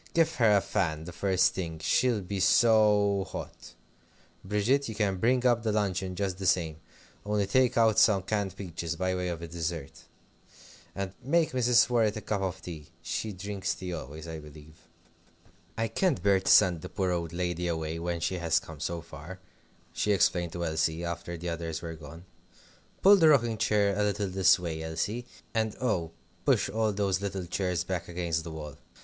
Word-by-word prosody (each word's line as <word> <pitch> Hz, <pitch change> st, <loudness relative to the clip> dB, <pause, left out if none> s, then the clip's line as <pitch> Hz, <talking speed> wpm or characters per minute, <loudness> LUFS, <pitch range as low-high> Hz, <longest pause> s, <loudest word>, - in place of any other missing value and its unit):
give 165 Hz, -1 st, +3 dB
her 110 Hz, -4 st, +5 dB
a -, -, +2 dB
fan 80 Hz, -8 st, -1 dB
the 85 Hz, -, -8 dB
first 95 Hz, +1 st, +2 dB
thing. 85 Hz, -4 st, -4 dB
She'll 115 Hz, +7 st, +1 dB
be 100 Hz, +1 st, -4 dB
so 105 Hz, -1 st, +4 dB
hot. -, -, -8 dB, 0.7 s
Bridget, 110 Hz, +8 st, +1 dB
you 110 Hz, -, -5 dB
can 100 Hz, -3 st, 0 dB
bring 125 Hz, +5 st, +2 dB
up 120 Hz, -2 st, +4 dB
the 110 Hz, -1 st, 0 dB
luncheon 95 Hz, -3 st, -1 dB
just 95 Hz, -1 st, -2 dB
the 95 Hz, -, -1 dB
same, 85 Hz, -5 st, +1 dB, 0.5 s
only 105 Hz, -1 st, 0 dB
take 125 Hz, +4 st, +2 dB
out 110 Hz, -2 st, +4 dB
some 100 Hz, -4 st, +4 dB
canned 100 Hz, 0 st, -2 dB
peaches, 85 Hz, -3 st, -5 dB
by 95 Hz, +2 st, -1 dB
way 90 Hz, 0 st, -2 dB
of 85 Hz, -1 st, -4 dB
a -, -, -5 dB
dessert, 80 Hz, -3 st, -5 dB, 0.9 s
and 95 Hz, -1 st, -4 dB
make 160 Hz, +5 st, +2 dB
Mrs. 125 Hz, -2 st, +4 dB
Worrett 115 Hz, -3 st, +2 dB
a -, -, -5 dB
cup 105 Hz, -2 st, -2 dB
of 95 Hz, 0 st, -3 dB
tea. 80 Hz, -4 st, -8 dB, 0.2 s
She 110 Hz, -, -3 dB
drinks 100 Hz, +1 st, -3 dB
tea 90 Hz, -1 st, -6 dB
always, 80 Hz, +1 st, -7 dB
I 80 Hz, -1 st, -6 dB
believe. 75 Hz, +1 st, -15 dB, 0.9 s
"I 115 Hz, 0 st, 0 dB
can't 135 Hz, -, 0 dB
bear 100 Hz, -1 st, +4 dB
to 95 Hz, -, -2 dB
send 85 Hz, -3 st, +5 dB
the -, -, -7 dB
poor 95 Hz, -2 st, -1 dB
old 85 Hz, -2 st, -2 dB
lady 90 Hz, 0 st, -2 dB
away 80 Hz, -1 st, -2 dB
when 85 Hz, 0 st, -3 dB
she 90 Hz, +1 st, -1 dB
has 85 Hz, -2 st, +2 dB
come 80 Hz, -2 st, -11 dB
so 85 Hz, +3 st, -3 dB
far," 85 Hz, +3 st, -10 dB, 0.5 s
she 105 Hz, -, +1 dB
explained 90 Hz, -3 st, +1 dB
to 85 Hz, -1 st, -3 dB
Elsie, 80 Hz, +1 st, -1 dB
after 85 Hz, 0 st, -5 dB
the 85 Hz, +1 st, -4 dB
others 85 Hz, -1 st, -4 dB
were 85 Hz, -1 st, -5 dB
gone. 80 Hz, +2 st, -11 dB, 0.8 s
"Pull 200 Hz, +1 st, +8 dB
the 160 Hz, -4 st, +6 dB
rocking 120 Hz, -7 st, +3 dB
chair 105 Hz, -2 st, +2 dB
a 105 Hz, -, 0 dB
little 105 Hz, -1 st, 0 dB
this 95 Hz, +1 st, +4 dB
way, 85 Hz, -3 st, -4 dB
Elsie. 100 Hz, +10 st, -3 dB, 0.3 s
And 110 Hz, -2 st, 0 dB
oh! 95 Hz, -10 st, 0 dB, 0.3 s
push -, -, +2 dB
all 110 Hz, 0 st, +1 dB
those 100 Hz, -2 st, 0 dB
little 95 Hz, -2 st, -3 dB
chairs 90 Hz, -1 st, -1 dB
back 90 Hz, -1 st, -4 dB
against 85 Hz, -2 st, -2 dB
the 85 Hz, -, -7 dB
wall. 75 Hz, -3 st, -8 dB
95 Hz, 190 wpm, -29 LUFS, 85-105 Hz, 0.9 s, Pull